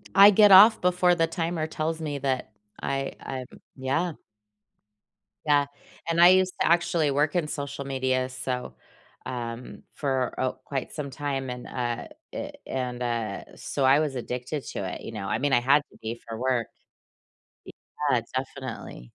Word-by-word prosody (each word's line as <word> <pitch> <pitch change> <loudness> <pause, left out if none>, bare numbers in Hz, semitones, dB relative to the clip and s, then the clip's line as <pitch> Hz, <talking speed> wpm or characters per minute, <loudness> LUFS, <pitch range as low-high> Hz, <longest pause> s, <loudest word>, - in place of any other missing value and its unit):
I 200 +1 +10
get 205 0 +6
off 210 +4 +9
before 180 0 +3
the 165 -1 +2
timer 165 -1 -2
tells 160 +1 -3
me 150 -2 -3
that 130 -4 -2 0.3
I 135 0 -2
I'm 130 -1 -5 0.3
yeah. 140 +6 -1 1.3
Yeah, 145 -1 +4 0.4
and 170 +1 +3
I 175 - +10
used 185 0 +4
to - - +3
actually 170 -3 +3
work 145 +3 +1
in 170 -4 +1
social 140 -1 -5
media 130 -1 0
so, 125 -1 -4 0.5
um, 120 -1 -6
for 130 -3 -1
a 130 -1 0
quite 135 -2 -4
some 145 -3 -4
time, 135 -1 -3
and, 125 0 -6
uh, 120 -2 -3 0.3
eh, - - -5 0.2
and, 125 -1 -3
uh, 120 -2 -2
so 140 - -3
I 135 +2 +6
was 150 -4 -1
addicted 125 +4 -4
to - - -3
it, - - -9
you - - -7
know, 100 -3 -5
I 105 +2 0
mean, 145 +1 +1
I 120 - +6
had 140 +4 +4
to - - -18
be 115 +1 -5
for 115 -1 -5
work. 125 -3 0 1.4
Yeah, 120 - +3
definitely. 130 - -6
135 Hz, 165 wpm, -26 LUFS, 125-160 Hz, 1.4 s, I